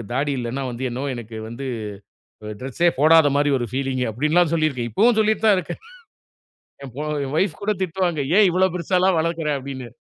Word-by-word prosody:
எனக்கு - - -7
தாடி 145 +2 0
இல்லைன்னா 125 +3 -3
வந்து, 120 +2 -7
என்னவோ 130 +4 -4
எனக்கு 115 -1 -8
வந்து 125 +4 -7 0.8
ஒரு 105 - -6
டிரெஸ்ஸே 135 +7 +1
போடாத 160 +1 +6
மாரி 145 0 +2
ஒரு 120 - -2
பீலிங்கு 130 -1 -1
அப்டின்ல்லாம் 155 +8 +2
சொல்லியிருக்கேன். 140 -7 0
இப்பவும் 225 - +3
சொல்லிட்டுத் 215 0 +1
தான் 205 - +6
இருக்கேன். 180 - -5 1.0
என் 135 - -8
பொ 145 - -4 0.2
என் 135 - -6
வொய்ஃப் 170 -2 0
கூட 210 +1 0
திட்டுவாங்க. 175 -3 -1 0.2
"ஏன் 210 -2 +6
இவ்வளவு 185 0 +2
பெருசால்லாம் 180 +1 +1
வளர்க்குற 165 -1 -1
அப்டின்னு. 130 -2 -7
150 Hz, 180 wpm, -22 LUFS, 130-180 Hz, 1.0 s, போடாத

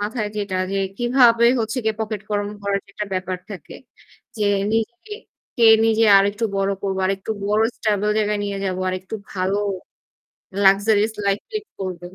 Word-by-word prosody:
মাথায় 210 +1 -2
যেটা 200 -2 -2 0.2
যে, - - -1 0.2
কিভাবে 240 -1 +4 0.2
হচ্ছে 225 +4 -2
গিয়ে 220 0 +1
pocket 215 -2 -3
গরম 205 0 -1
করার 200 0 0
যে - - -36
একটা 210 - -4
ব্যাপার 185 0 -2
থাকে 185 -8 -9 0.6
যে, 210 - -1 0.3
"নিজেকে 240 - -3 0.4
কে 235 - +3 0.2
নিজে 225 0 +3
আরেকটু 205 +3 0
বড় 195 0 +1
করব, 195 -1 -2
আরেকটু 195 +2 -3 0.2
বড় 210 +2 +2
stable 210 -1 0
জায়গায় 210 -1 0
নিয়ে 200 -1 -3
যাব, 185 -1 -2
আরেকটু 185 +3 -5 0.2
ভালো 190 +1 -1 1.1
luxurious 205 +2 +4
life 200 +1 0
lead 430 -1 -4
করবেন।" 180 -1 -6
205 Hz, 160 wpm, -21 LUFS, 195-220 Hz, 1.1 s, কিভাবে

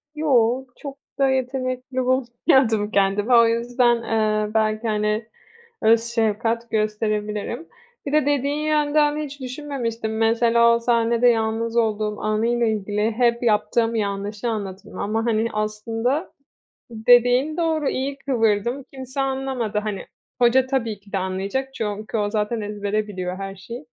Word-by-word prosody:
Yoo, 260 -4 +2
çok 280 -1 -8 0.2
da 275 -1 +4
yetenekli 255 0 -2
bulmuyordum 250 -3 +2
kendimi. 200 +4 +2
O 235 -1 +7
yüzden, 240 +1 +2
ııı, 215 -2 0
belki, 220 +1 +1
hani, 210 +1 0 0.6
öz 225 +1 +5
şefkat 230 0 -1
gösterebilirim. 215 +5 -2 0.4
Bir 280 - -3
de 300 -2 +3
dediğin 290 +1 0
yönden 300 -1 +2
hiç 290 -2 -6
düşünmemiştim. 250 -5 -4
Mesela 235 +1 +4
o - - +1
sahnede 235 0 +2
yalnız 225 0 0
olduğum 215 -2 0
anıyla 230 +3 +1
ilgili 210 0 0
hep 235 +1 +1
yaptığım 230 +1 +1
yanlışı 205 +1 -2
anlatırım 200 -3 -5
ama, 225 +3 -1
hani, 230 0 +1
aslında 225 - -2 0.6
dediğin 245 +6 +4
doğru. 320 -4 +1
İyi 275 +2 -3
kıvırdım. 240 -1 0
Kimse 265 +1 -5
anlamadı, 265 -5 -2
hani. 210 -2 -4 0.4
Hoca 250 +2 +5
tabii 235 -6 -2
ki 200 0 -20
de - - -1
anlayacak 195 +8 -3
çünkü 215 0 -4
o 205 -1 0
zaten 215 +1 -1
ezbere 210 0 -2
biliyor 185 -3 -4
her 195 0 -6
şeyi. 235 +8 -9
230 Hz, 135 wpm, -22 LUFS, 215-255 Hz, 0.6 s, O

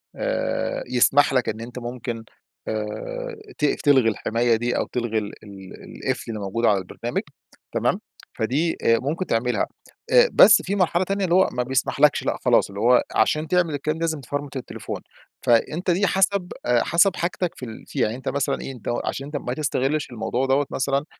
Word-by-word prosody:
آآ - - -2
يسمح 135 +3 +4
لك 125 -3 +1
إن 110 - -4
أنت 120 +2 -7
ممكن 120 -1 -5 0.4
آآ 475 - -4 0.2
تقف 150 - +1
تلغي 135 -5 +5
الحماية 115 +2 +1
دي 120 +2 -1
أو - - 0
تلغي 120 -2 -2
ال 105 -1 -2
ال 95 -2 -11 0.2
القفل - - -2
اللي 110 - -5
موجود 105 +4 -2
على 105 -3 +4
البرنامج 95 -1 -4 0.5
تمام؟ - - +1 0.4
فدي 145 +9 0
آآ 115 0 +4
ممكن 160 +8 -2
تعملها. 125 -2 0 0.4
أ - - +7
بس 215 - +8
في 195 - -2
مرحلة 180 -2 +2
تانية 195 +1 -1
اللي 175 -1 +2
هو 190 - +5
ما 125 - -1
بيسمحلكش، 130 +1 +2
لأ - - -1
خلاص - - +4
اللي 100 0 -7
هو 120 +3 +5
عشان 155 +8 +2
تعمل 175 -3 +2
الكلام 155 +2 -2
ده - - -9
لازم 160 -3 -1
تفرمت 145 +2 -5
التليفون. 130 - -6 0.4
فأنت 155 +10 +2
دي 195 +4 +2
حسب 190 0 +1
أ 120 -1 +3
حسب 175 +3 +3
حاجتك 175 0 -2
في 125 - -7
ال 110 -2 -10
فيها. - - -1
يعني 110 - -2
أنت 130 - -4
مثلًا 140 0 -1
إيه، 130 -2 -7 0.3
عشان 135 - -3
أنت 145 +1 -4
ما 125 -3 -4
تستغلش 145 +1 -1
الموضوع 120 +2 -1
دوّة 135 +2 +2
مثلًا 140 +2 0
135 Hz, 185 wpm, -23 LUFS, 115-165 Hz, 0.5 s, بس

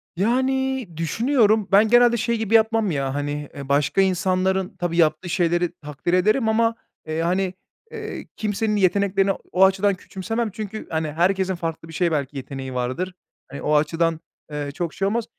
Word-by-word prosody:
Yani, 260 +4 0
düşünüyorum, 215 - +2
ben 205 +3 +6
genelde 240 +1 +5
şey 235 +1 0
gibi 220 0 -2
yapmam 220 -3 +3
ya, 135 -2 -2
hani, 145 0 -3
eee, 140 -1 -8
başka 145 +7 +2
insanların, 190 +1 +1
tabii 175 -1 -2
yaptığı 160 +2 +2
şeyleri 175 -1 +1
takdir 150 +4 -4
ederim 215 +6 +3
ama, 230 +1 +2 0.3
eee, 160 +1 -2
hani, 185 +2 0 0.4
eee, 440 -1 -6
kimsenin 210 0 -1
yeteneklerini 195 0 +2
o - - -5
o 190 +1 +6
açıdan 195 +1 +2
küçümsemem 225 +5 -3
çünkü, 215 +1 -6
hani, 160 -1 -2
herkesin 185 +3 +1
farklı 165 -1 -5
bir 165 - -11
şeye 175 -1 +1
belki 140 -2 -2
yeteneği 135 -1 -6
vardır, 130 +10 -2 0.4
hani, 140 - -7
o 150 - +1
açıdan, 165 +2 +1 0.3
eee, 145 -1 -4
çok 170 0 -3
şey 195 - -1
olmaz. 230 +2 -1
185 Hz, 170 wpm, -23 LUFS, 160-215 Hz, 0.4 s, ben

